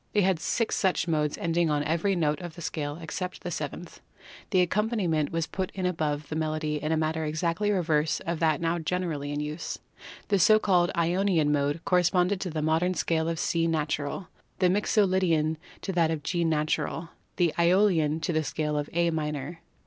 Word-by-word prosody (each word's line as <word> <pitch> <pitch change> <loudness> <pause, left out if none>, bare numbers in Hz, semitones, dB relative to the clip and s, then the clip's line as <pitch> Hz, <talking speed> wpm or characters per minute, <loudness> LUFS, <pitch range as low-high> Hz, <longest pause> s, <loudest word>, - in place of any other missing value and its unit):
They 205 - +3
had 185 -3 +2
six 230 +5 0
such 185 -3 +1
modes 150 -3 0
ending 170 0 +1
on 145 -1 +1
every 165 +6 +1
note 150 -3 0
of 175 -3 -7
the 170 - -9
scale 145 -1 -3
except 180 +2 -5
the 175 - -4
seventh. 155 +2 -6 0.5
The 185 -3 +4
accompaniment 180 -6 0
was 165 -1 0
put 190 +1 -3
in 185 -1 -2
above 155 -4 -1
the 155 - -3
melody 155 -1 -1
in 155 - -1
a 160 - +2
manner 160 0 0
exactly 165 +6 -1
the 205 - +2
reverse 160 -4 +1
of 170 -1 -3
that 160 -3 +2
now 170 +1 0
generally 160 -4 -2
in 145 0 -2
use. 150 +2 -4 0.5
The 200 -2 +3
so 215 +4 +6
called 180 -5 +3
Ionian 170 -2 +2
Mode 145 +2 0
corresponded 180 +1 +2
to 185 - -2
the 155 -2 -3
modern 165 +4 +1
scale 160 0 0
of 165 - -2
C 165 +1 +1
natural, 155 +2 -2 0.3
the 185 -1 +3
Mixo 205 +1 +3
lydian 165 -4 +1 0.3
to 195 - -2
that 170 -2 +3
of 160 -2 -2
G 170 +2 0
natural, 160 +1 -1 0.3
the 175 -3 +2
iEolian 170 -4 +3
to 170 - 0
the 155 0 +1
scale 150 0 -1
of 145 - -4
A 170 0 +2
minor. 150 0 -3
165 Hz, 195 wpm, -27 LUFS, 155-180 Hz, 0.5 s, so